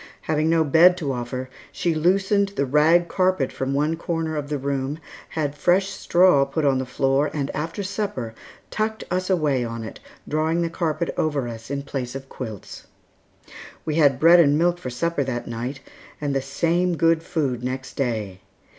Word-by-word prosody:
Having 155 0 0
no 165 -1 +4
bed 165 +5 +6
to 145 -6 -2
offer, 125 +1 -4 0.2
she 170 - -1
loosened 195 +5 +2
the 140 - +1
rag 155 +5 +4
carpet 185 -7 +1
from 130 0 -3
one 150 +4 +1
corner 165 -1 -3
of 145 -1 -4
the 150 - -1
room, 140 +1 -2 0.3
had 150 -3 -2
fresh 180 +6 +2
straw 175 -7 +4
put 140 +3 -2
on 135 -2 +3
the 130 - -3
floor, 135 +3 +1
and 140 -2 -2
after 165 +6 -3
supper, 190 - -3 0.4
tucked 220 0 -2
us 185 +1 -1
away 150 -8 +1
on 115 -1 -5
it, 110 - -8 0.3
drawing 160 +3 0
the 165 - -2
carpet 165 -1 -1
over 145 -5 0
us 115 0 -8
in 140 0 -3
place 130 -3 -5
of 135 0 -7
quilts. 110 -6 -8 1.0
We 155 - -1
had 140 -5 +4
bread 170 +3 +7
and 145 -3 +5
milk 175 +2 +2
for 130 - -5
supper 155 +4 -1
that 120 -2 -3
night, 120 +4 -5 0.4
and 145 -2 -2
the 135 - +1
same 170 +5 0
good 165 0 +3
food 145 -8 -2
next 130 +1 -4
day. 110 -8 -3
150 Hz, 180 wpm, -23 LUFS, 135-170 Hz, 1.0 s, bread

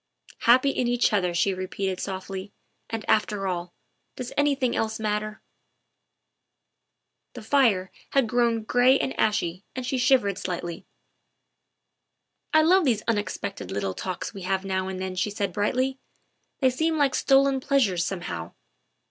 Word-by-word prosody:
" - - -21
Happy 255 +3 +6
in 250 -2 -1
each 245 -2 +2
other," 180 -4 +2
she 175 +3 +1
repeated 185 0 -3
softly, 190 +1 -5 0.2
" - - -47
and, 225 -1 -4
after 210 -2 +1
all, 180 -2 -3 0.4
does 250 -1 -6
anything 280 -4 +1
else 220 0 -1
matter? 215 0 -2 0.6
' - - -55
' - - -55
The 240 - -8
fire 220 -7 +2 0.2
had 270 -4 +2
grown 235 -1 +1
gray 245 +4 +4
and 265 - -2
ashy 195 -4 0
and 255 -1 -4
she 255 0 -1
shivered 245 -7 +3
slightly. 175 -2 -5 0.6
' - - -54
' - - -52
I 315 0 +5
love 370 +4 +5
these 235 -7 +1
unexpected 205 -2 -2
little 100 -2 -2
talks 185 - -5
we 195 - -8
have 190 +1 -1
now 190 -1 -1
and 190 -1 -5
then," 185 0 -3
she 185 +3 0
said 200 -3 -3
brightly; 255 +7 0 0.3
" - - -48
they 260 -1 +4
seem 320 +5 0
like 280 -3 +2
stolen 275 0 +3
pleas 275 -1 +3
ures 180 -3 -2
somehow. 175 - -4
215 Hz, 165 wpm, -26 LUFS, 190-255 Hz, 0.6 s, Happy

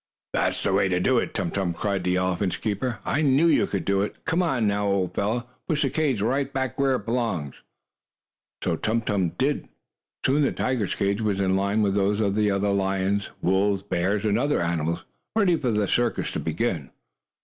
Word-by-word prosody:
"That's - - 0
the 100 - +1
way 95 0 +3
to 90 -1 +1
do 125 +6 +3
it, - - -4
Tum 90 -5 -1
Tum!" 90 -3 -1
cried 100 +2 -1
the 90 0 +1
elephant's 90 +1 0
keeper. 110 +3 -2
"I 145 - +1
knew 140 +2 +4
you 160 -4 +4
could 100 - -3
do 100 0 +2
it. 105 - -2
Come 165 +2 +1
on 135 -10 +1
now, 100 0 +1
old 100 -2 0
fellow. 115 +4 -1 0.2
Push 150 -2 +1
the 135 - 0
cage 140 -10 0
right 135 +4 0
back 130 -2 -3
where 135 -1 +3
it 105 - -5
belongs." 115 - -1 1.1
Tum 110 +8 0
Tum 100 -5 +1
did 140 +2 0
so. - - -28 0.6
Soon 140 +3 +3
the 140 - +2
tiger's 125 -7 -1
cage 100 +1 0
was 105 -3 0
in 95 -1 +2
line 100 +3 +1
with 100 -1 +2
those 100 +1 +1
of 100 -3 +1
the 105 0 +2
lions, 100 0 0
wolves, 95 +2 +2
bears 100 +2 0
and 105 +1 +2
other 145 +3 +1
animals, 85 0 -1 0.3
ready 200 -6 +4
for 130 -6 -1
the 105 -3 +1
circus 120 +4 0
to - - -3
begin. 80 - -2
105 Hz, 200 wpm, -25 LUFS, 95-125 Hz, 1.1 s, knew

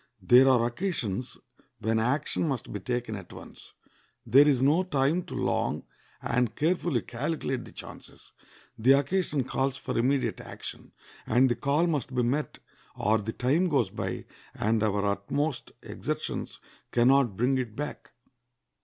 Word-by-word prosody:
There 125 +8 +6
are 125 -3 +4
occasions 120 - -3 0.4
when 110 +1 0
action 140 +7 0
must 135 -5 -3
be 105 - -3
taken 120 +1 -3
at 95 -3 -9
once. - - -13 0.5
There 140 +3 +6
is 140 -4 +3
no 145 +7 +4
time 155 -1 +1
to - - -7
long - - -1 0.4
and 120 -1 0
carefully 160 - 0
calculate 135 - -3
the - - -12
chances. - - -11 0.5
The 125 +5 +6
occasion 145 0 +1
calls 135 +1 -1
for 125 - -5
immediate 130 +3 +1
action; - - -9 0.4
and 125 +3 +4
the 120 - +1
call 145 +7 +1
must 145 -6 -2
be 125 - +2
met, 140 +6 -1 0.4
or 110 +1 +2
the 110 +2 -4
time 150 +9 +1
goes 125 - +1
by, - - -4 0.3
and 110 0 +1
our 105 -2 +1
utmost 120 +9 -1
exertions - - -4 0.3
can 120 +1 +4
not 135 -8 +3
bring 130 +3 +2
it 115 -4 -4
back. 150 +1 -6
130 Hz, 150 wpm, -28 LUFS, 115-145 Hz, 0.5 s, There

